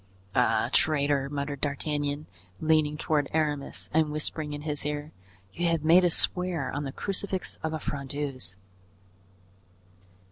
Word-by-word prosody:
"Ah, - - +2
traitor!" 145 -2 +2
muttered 140 -1 -4
D'Artagnan, 145 0 -2 0.3
leaning 155 -1 +2
toward 150 -2 0
Aramis 150 -3 -1
and 155 -1 +2
whispering 150 0 -2
in 145 0 -6
his 150 -2 -2
ear, 150 +1 -4 0.4
"you 175 0 -1
have 165 -2 +1
made 170 +4 +6
us 175 -2 +5
swear 180 -7 +3
on 145 +1 -3
the 135 - -4
crucifix 195 +2 -1
of 160 - -2
a 160 - -2
Frondeuse." 140 -9 -5
150 Hz, 135 wpm, -28 LUFS, 145-160 Hz, 0.4 s, made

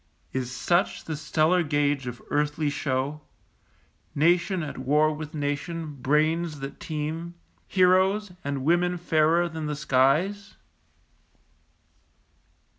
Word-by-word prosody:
Is 125 -2 -2
such 175 +7 0
the 160 - -3
stellar 155 +4 +2
gauge 145 -3 0
of 120 0 -7
earthly 150 0 0
show, 140 +1 -2 0.9
Nation 170 +4 +2
at 145 - -6
war 150 +4 +2
with 155 0 -7
nation, 150 +2 -3
brains 155 +2 +1
that 135 0 -7
teem, 165 +1 -4 0.3
Heroes, 190 +2 +3
and 140 -2 -3
women 175 +2 +2
fairer 165 0 +2
than 160 -2 -5
the 150 - -2
skies? 150 +9 +1
155 Hz, 110 wpm, -26 LUFS, 145-170 Hz, 0.9 s, Heroes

